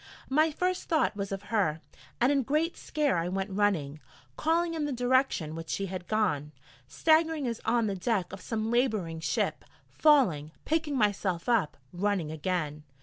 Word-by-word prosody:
My 310 +3 +4
first 365 +4 -2
thought 315 -9 +2
was 200 -1 -4
of 195 0 -4
her, 165 -8 +2 0.4
and 245 +3 +4
in 280 -1 +3
great 305 +6 0
scare 290 - 0
I 170 +1 -2
went 195 +2 -2
running, 185 -8 0 0.4
calling 330 +2 +1
in 315 -2 -1
the 295 - -2
direction 245 - +1
which 165 0 -7
she 195 - -1
had 185 -2 -6
gone, 150 -9 0 0.3
staggering 315 - +2
as 230 -2 -3
on 235 -2 +2
the 205 - -1
deck 195 -1 -1
of 190 - -7
some 220 +1 -2
labouring 215 -10 0
ship, 160 - -1 0.3
falling, 185 - +3
picking 310 -3 0
myself 200 -5 0
up, 225 -10 +1 0.2
running 185 -4 -1
again. 155 -2 -2
210 Hz, 165 wpm, -29 LUFS, 175-280 Hz, 0.4 s, My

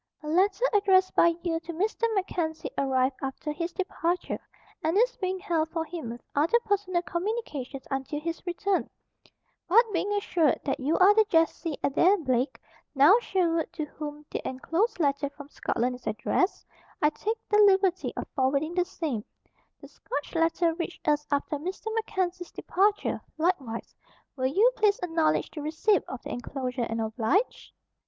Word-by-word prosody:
"A - - -7
letter 385 +8 +2
addressed 380 -2 +4
by 335 0 +4
you 330 -2 0
to 335 +1 -8
Mr. 425 +6 0
MacKenzie 340 -5 -2
arrived 265 -1 +1
after 270 +3 -4
his 335 +3 -3
departure 355 -1 -2 0.4
and 325 +4 +1
is - - +3
being 375 0 -1
held 335 -5 -1
for 325 0 -2
him 325 -8 -6
with 235 +1 -8
other 320 +11 +3
personal 380 -4 0
communications 340 - -4
until 270 +2 -2
his 335 +2 -4
return; 380 +2 0 0.8
but 460 +7 +7
being 380 +4 0
assured 345 -7 +2
that 275 - -1
you 290 +5 +1
are 385 +2 +7
the 440 +1 +5
Jessie 325 -2 +1
Adair 355 +8 +4
Blake, 260 -4 -1 0.4
now 295 - +7
Sherwood 340 -7 0
to 310 - -3
whom 300 0 -8
the - - -3
enclosed 340 - -1
letter 285 -2 +1
from 285 0 -12
Scotland 250 -3 -1
is 250 - -10
addressed, 365 - 0 0.3
I 300 - +3
take 435 +8 -2
the 420 - +3
liberty 385 -3 +4
of - - -4
forwarding 280 +4 +1
the 360 0 +1
same. 305 - -3 0.6
The - - -11
Scotch 290 - -6
letter 330 0 +2
reached 340 0 -6
us 300 0 +2
after 285 +1 0
Mr. 380 +7 -5
MacKenzie's 370 -5 -2
departure, 410 +2 0 0.2
likewise. 295 -9 -1 0.4
Will 260 -2 0
you 410 - +4
please 420 -2 +3
acknowledge 325 -2 +1
the 305 - -6
receipt 320 +7 +2
of 255 - -7
the - - -6
enclosure 250 0 -3
and 225 0 -2
oblige?" 225 - 0
330 Hz, 160 wpm, -27 LUFS, 285-380 Hz, 0.8 s, but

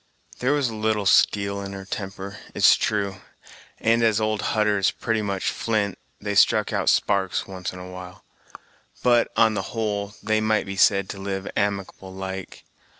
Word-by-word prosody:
There 130 +3 +2
was 145 -3 +1
a - - -7
little 110 -1 0
steel 100 +1 +3
in 100 0 -6
her 95 0 -8
temper, 100 0 -6 0.2
it's - - +7
true, 100 -2 -1 0.6
and, 115 +1 +3
as 110 -2 +3
old 110 -1 0 0.2
Hutter 105 -1 +2
is 95 - +3
pretty 115 -1 -2
much 100 -2 -1
flint, 105 -4 -1 0.2
they - - -3
struck - - +4
out - - +1
sparks 95 -2 +1
once 95 -2 -5
and 90 - -10
a 90 - -8
while; 90 0 -10 0.8
but, 120 -1 +4
on 110 -1 +5
the 100 - -1 0.2
whole, 105 -2 -2
they 110 0 +1
might 110 -1 +1
be 95 - -5
said 100 +2 +4
to 100 - -6
live 95 0 -4
amicable 100 -2 -2
like. 95 0 -7
100 Hz, 175 wpm, -24 LUFS, 95-110 Hz, 0.8 s, it's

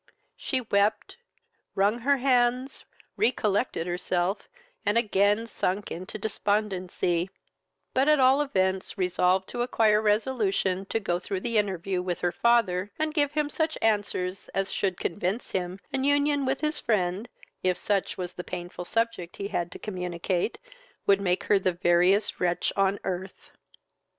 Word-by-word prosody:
She 260 -2 -2
wept, 210 - 0 0.6
wrung 205 +4 +2
her 280 +4 +2
hands, 255 0 +1 0.3
recollected 210 -6 +1
herself, 180 +2 -1 0.3
and 205 +3 +2
again 210 0 +2
sunk 200 -3 -2
into 185 +5 -6
despondency; 195 -4 -1 0.6
but 265 +2 +2
at 305 -1 +5
all 265 +2 +5
events 190 -9 0
resolved 185 0 +2
to 240 - -3
acquire 220 -3 +3
resolution 210 -4 +1
to 225 - -1
go 175 -4 -1
through 185 +1 -4
the 230 -1 +1
interview 190 -2 -1
with 180 -2 -3
her 175 - +1
father, 205 -3 +2
and 310 0 -1
give 290 -2 +1
him 300 -1 +1
such 315 +1 -1
answers 200 -4 -1
as 195 0 0
should 190 -3 -1
convince 190 +5 -2
him 185 0 -3
an 265 -1 0
union 285 0 +2
with 270 +1 0
his 305 0 0
friend 205 0 0 0.3
(if 185 -1 +1
such 200 -2 -1
was 180 -1 -4
the 180 - -6
painful 175 0 -6
subject 230 -5 -1
he 200 - -4
had 175 -4 -2
to - - -8
communicate) 180 0 -2 0.5
would 200 0 +4
make 180 -2 +1
her 205 - +3
the 185 -1 +1
veriest 180 +3 +3
wretch 175 -1 0
on 195 0 +2
earth. 185 +1 -5
200 Hz, 150 wpm, -27 LUFS, 180-235 Hz, 0.6 s, at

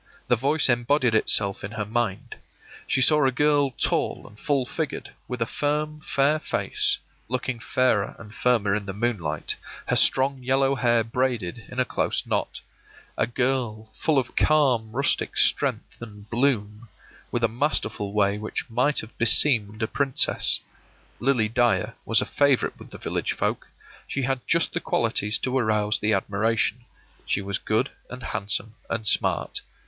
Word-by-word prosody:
The 120 - +5
voice 140 +6 +1
embodied 120 0 +2
itself 100 -2 +2
in 100 +3 -6
her 105 -1 -3
mind. 110 -2 -2 0.5
She 130 - +1
saw 150 +3 +5
a 135 - +3
girl 145 +1 +2
tall 125 - -1
and 105 +1 -16
full 140 -3 0
figured, 155 +4 -4 0.2
with 125 -2 -2
a - - -4
firm, 150 +4 -2
fair 145 +3 +1
face, - - 0 0.3
looking 125 -1 -2
fairer 115 -4 +1
and 110 -1 -12
firmer 115 -6 +1
in 100 -1 -2
the 95 - -5
moonlight, 110 -6 -2 0.3
her - - +2
strong 135 0 +3
yellow 135 +2 +2
hair 120 -3 +2
braided 115 -3 -2
in 125 - -6
a 130 - +3
close - - -1
knot. - - -2 0.5
A - - 0
girl 120 -3 -2
full 150 +6 0
of 130 -3 +1
a - - -20
calm 130 -8 +2
rustic 135 +4 0
strength - - +1
and 105 -3 -11
bloom, 115 -3 -1 0.4
with 120 - -2
a - - +5
masterful 110 -5 -1
way 100 0 +1
which 110 - -5
might 125 +5 +1
have 110 - -13
beseemed 110 -3 +5
a - - +1
princess. 140 +2 +2 0.6
Lily 120 -4 +2
Dyer 115 -1 +1
was 115 - +4
a - - -2
favorite 140 -3 +1
with - - -12
the - - -10
village - - -2
folk; - - -2 0.4
she 135 - -2
had 135 0 -1
just 170 0 +2
the 175 - -1
qualities 110 -7 0
to 130 0 -2
arouse 105 -4 +1
the 105 - 0
admiration. 110 +4 0 0.4
She 100 - 0
was 100 0 -2
good 110 +5 0 0.2
and 125 0 -9
handsome 105 +1 -2 0.2
and 110 -2 -2
smart. - - +1
120 Hz, 165 wpm, -25 LUFS, 110-135 Hz, 0.6 s, The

